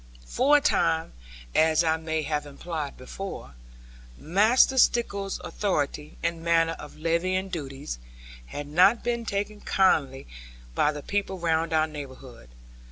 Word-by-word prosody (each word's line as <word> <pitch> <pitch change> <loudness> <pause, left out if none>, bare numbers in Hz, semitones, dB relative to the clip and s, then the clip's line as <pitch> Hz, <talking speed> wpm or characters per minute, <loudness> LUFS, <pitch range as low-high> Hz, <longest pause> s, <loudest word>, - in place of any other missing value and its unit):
For 280 - +4
a - - 0
time 160 - +1 0.4
(as 160 +1 +4
I 160 -1 +2
may 160 -1 -2
have 150 0 -2
implied 150 0 -5
before) 130 - -7 0.6
Master 220 - +4
Stickles's 200 -6 +1
authority, 150 -6 -2
and 170 0 -1
manner 165 0 +2
of 150 - -11
levying 180 +4 0
duties, 135 - -6 0.5
had 145 - -6
not 185 +10 +4
been 235 -1 -1
taken 205 +1 -3
kindly 145 -9 +2 0.5
by 150 - +2
the 145 -1 -7
people 200 -1 -2
round 165 -1 0
our 155 -1 +3
neighbourhood. 130 - -10
165 Hz, 130 wpm, -26 LUFS, 150-195 Hz, 0.6 s, For